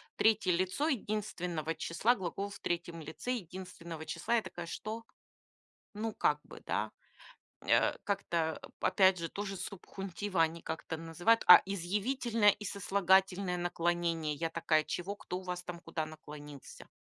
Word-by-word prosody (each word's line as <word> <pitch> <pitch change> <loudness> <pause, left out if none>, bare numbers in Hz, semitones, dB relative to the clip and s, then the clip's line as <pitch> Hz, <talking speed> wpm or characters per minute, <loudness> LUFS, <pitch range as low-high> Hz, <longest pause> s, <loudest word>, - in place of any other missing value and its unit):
3 210 -4 +4
лицо 185 - +1
единственного 180 - -2
числа, 175 +9 +2
глагол 195 +2 -3
в - - -10
3 170 -1 -3
лице 160 +11 -5
единственного 175 -5 -7
числа. 235 - -1
Я 230 - +3
такая: 175 -4 -7
"Что?" 220 +6 -5 0.9
Ну, 220 +2 -2
как - - +2
бы, - - -12
да, - - -1 0.7
э, - - +3
как-то, 170 -6 -1
э, - - -7
опять 190 -1 +4
же, 165 0 -3
ту 205 - -4
же 195 -1 -4
субхунтива 195 -1 -3
они 165 +1 +1
как-то 160 0 -4
называют. 165 +8 +2
А 180 - +12
изъявительное 210 +4 +2
и 210 - 0
сослагательное 190 -1 +2
наклонение? 170 -2 0
Я 165 +2 -2
такая: 160 -1 +2
"Чего? 195 +4 -3
Кто 180 - -5
у - - -10
вас 180 -1 -3
там 175 -1 -7
наклонился?" 150 -3 -7
180 Hz, 145 wpm, -33 LUFS, 165-200 Hz, 0.9 s, А